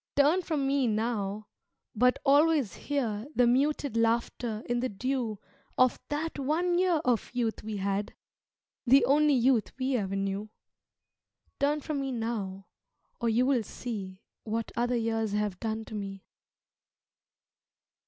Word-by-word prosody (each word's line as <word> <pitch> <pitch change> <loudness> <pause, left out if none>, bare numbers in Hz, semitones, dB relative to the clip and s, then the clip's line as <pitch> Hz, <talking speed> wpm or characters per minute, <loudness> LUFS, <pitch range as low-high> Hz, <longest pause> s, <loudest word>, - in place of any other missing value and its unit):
Turn 295 +6 +4
from 310 -5 -1
me 275 -2 +2
now, 215 -2 -1 0.5
but 250 +3 +3
always 290 - +4
hear 240 -6 -2
The 250 - +5
muted 275 +1 +1
laughter 230 0 0
in 240 0 0
the 255 +1 -1
dew 240 0 -2 0.4
Of 255 -1 +4
that 300 +1 -3
one 345 +6 +1
year 360 -4 +2
of 245 -3 +1
youth 230 -3 -1
we 215 -1 -4
had, 200 +1 -2 0.7
The 270 +3 +6
only 295 +1 +4
youth 245 -4 +3
we 260 0 0
ever 195 -3 -2
knew 195 +2 -2 1.1
Turn 290 +1 +1
from 290 -1 -3
me 270 -1 -2
now, 215 -5 -3 0.5
or 235 - +1
you 235 +3 +3
will 260 -3 +3
see 200 -4 -6 0.2
What 225 +1 -3
other 245 +1 +1
years 225 -2 -1
have 210 -3 -1
done 220 -1 -3
to - - -11
me. 195 -2 -6
240 Hz, 140 wpm, -29 LUFS, 215-275 Hz, 1.1 s, The